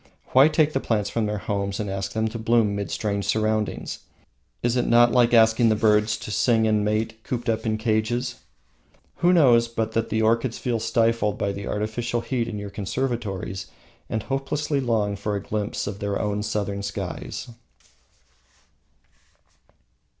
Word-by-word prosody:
Why 135 +3 +7
take 155 -1 +2
the 135 - +1
plants 105 -5 -1
from 115 -2 0
their 105 0 -2
homes 100 -1 -3
and 105 - -2
ask 95 0 -3
them 110 0 0
to 115 +1 -6
bloom 110 -2 +2
mid 100 -1 -3
strange 100 -2 -2
surroundings? 110 -1 -1 0.6
Is 120 0 +1
it 125 - +1
not 120 0 +5
like 120 -1 +4
asking 115 0 +5
the 110 - +3
birds 105 0 +3
to 105 - -7
sing 110 +1 +3
and 105 -1 +2
mate 110 +1 -1
cooped 120 -1 -4
up 110 0 0
in 110 0 0
cages? 115 +3 -1 0.8
Who 175 - +3
knows 125 -9 +5
but 115 -1 -2
that 115 0 -1
the 110 0 0
orchids 115 +2 +1
feel 120 -2 -1
stifled 115 -1 +1
by 100 - -1
the 100 0 -6
artificial 115 +3 -2
heat 120 -2 -2
in 105 - -5
your 100 -1 -6
conservatories 100 -3 -3 0.4
and 110 -2 -2
hopelessly 140 +3 -1
long 110 -5 0
for 105 +1 -2
a 100 - -4
glimpse 105 -1 -3
of 100 -1 -5
their 100 -1 -2
own 105 0 -1
Southern 100 -1 -2
skies? 100 +2 -5
110 Hz, 165 wpm, -24 LUFS, 105-120 Hz, 0.8 s, Why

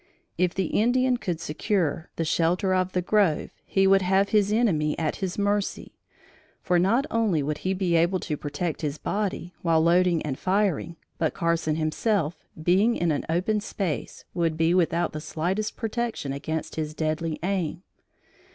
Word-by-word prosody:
If 180 0 +1
the 190 - 0
Indian 250 +7 +2
could 180 -8 -3
secure 170 +1 -1
the 165 - -1
shelter 175 +4 +1
of 185 0 0
the 180 - 0
grove, 195 -6 +2 0.2
he 195 0 +2
would 195 0 +5
have 190 +2 +2
his 210 -1 +3
enemy 175 -10 +2
at 155 -2 -1
his 190 -2 -3
mercy; 205 0 -1 0.6
for 180 -2 +2
not 225 +10 +3
only 210 -10 +1
would 150 +1 -2
he 190 +1 -1
be 185 -3 +1
able 170 +3 +3
to 155 - -2
protect 155 +3 -4
his 150 -1 -2
body, 195 -3 -3
while 165 -2 +3
loading 175 +1 +3
and 135 -3 -4
firing, 185 -4 0 0.2
but 160 -2 0
Carson 170 -2 0
himself, 160 +2 0 0.3
being 195 +8 +3
in 170 -1 +1
an 145 - -2
open 185 +6 +1
space, 195 -6 -4
would 165 -3 0
be 165 +1 +3
without 175 -1 +1
the 155 - -5
slightest 185 +8 -2
protection 225 - -2
against 160 +4 -4
his 155 -1 -3
deadly 155 0 -1
aim. 180 -2 -2
175 Hz, 165 wpm, -26 LUFS, 160-200 Hz, 0.6 s, would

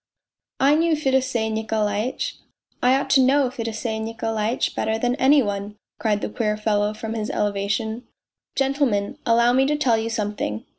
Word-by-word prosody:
" - - -63
I - - +6
knew 325 +1 +3
Fedosey 260 -6 0
Nikolaitch. 220 - -2 0.4
I 250 +1 +4
ought 270 0 -1
to 270 - +6
know 265 0 +3
Fedosey 225 -2 -3
Nikolai 225 0 -2
tch - - -1
better 220 0 -1
than 245 +2 0
any 275 +1 +5
one! 205 0 -4
" - - -60
cried 210 -2 0
the - - -3
queer 210 -3 -1
fellow 210 0 0
from 220 +1 -5
his 215 -2 -3
elevation. 210 +3 -2 0.2
" - - -61
Gentlemen, 270 -7 0
allow 235 +1 +4
me 265 +1 +3
to 300 - +1
tell 260 -6 +2
you 225 +1 -2
something. 205 - -3
225 Hz, 180 wpm, -23 LUFS, 210-260 Hz, 0.4 s, I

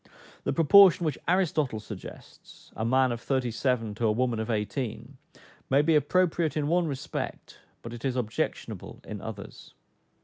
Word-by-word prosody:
The - - +1
proportion 180 +2 +6
which 150 -4 -2
Aristotle 155 - +1
suggests 105 - -12
(a 110 - -3
man 130 +2 +3
of 120 -1 -4
thirty 130 -2 -1
seven 115 -2 -1
to 115 +2 0
a - - +3
woman 120 0 0
of 110 +1 -3
eighteen,) 110 +2 -3 0.5
may 140 +2 +4
be 165 +2 +3
appropriate 165 -1 +1
in 145 -1 0
one 175 +1 +2
respect, 140 -3 -5 0.2
but 115 - -7
it 120 - -9
is 130 -2 -1
objectionable 115 -3 -4
in 105 -2 -7
others. 105 -2 -9
130 Hz, 160 wpm, -27 LUFS, 115-155 Hz, 0.5 s, proportion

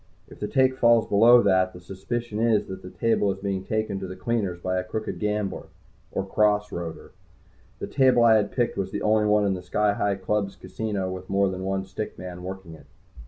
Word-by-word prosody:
If - - -15
the 105 - -3
take 130 +3 +2
falls 115 -1 +5
below 120 +4 +6
that, 95 -1 +2
the 90 - -10
suspicion 105 +5 -5
is 115 -2 +2
that 95 0 -8
the 90 - -9
table 110 -1 +1
is 95 - -5
being 95 -1 -3
taken 110 -1 -2
to 95 - -5
the 95 - -7
cleaners 100 -3 -2
by 90 +1 -1
a - - -3
crooked 110 +4 -5
gambler, 105 -2 -2 0.4
or 95 - -2
"cross 105 +1 +1
roader." 85 -2 -6 0.7
The - - -5
table 130 -3 +3
I 115 -1 +6
had 105 -1 0
picked 120 -2 -1
was 95 -1 -2
the - - -4
only 105 0 +3
one 105 0 +3
in 100 - +1
the 90 - -5
Sky 105 +3 +1
Hi 100 -1 0
Club's 100 +1 -2
casino 100 -4 -4
with 95 0 -8
more 100 0 +2
than 95 0 -5
one 95 0 -2
stick 95 +3 -6
man 90 -1 -8
working 95 -2 -8
it. 80 - -15
100 Hz, 215 wpm, -25 LUFS, 95-110 Hz, 0.7 s, below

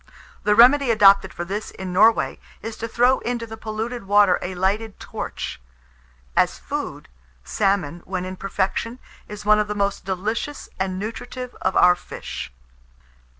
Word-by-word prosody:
The 210 0 +4
remedy 255 +4 +6
adopted 200 -4 +6
for 175 - -5
this 205 +4 -4
in 185 -1 -7
Norway, 220 +4 +4 0.2
is 225 0 -5
to 230 - -4
throw 245 +3 +3
into 240 -1 -3
the 225 -1 -8
polluted 220 +1 -5
water 200 -2 +4
a 185 +1 -4
lighted 200 +4 -1
torch. - - -6 0.7
As - - +2
food, - - -5 0.4
salmon, 195 - 0
when 185 -1 -3
in 185 0 -5
perfection, 195 +5 -2 0.3
is 210 0 -9
one 210 0 +5
of 210 - 0
the 210 - -3
most 200 0 -1
delicious 210 +9 -3
and 190 -1 -1
nutritive 235 +4 -6
of 190 0 0
our 180 - +7
fish. 175 - -7
205 Hz, 150 wpm, -22 LUFS, 190-225 Hz, 0.7 s, our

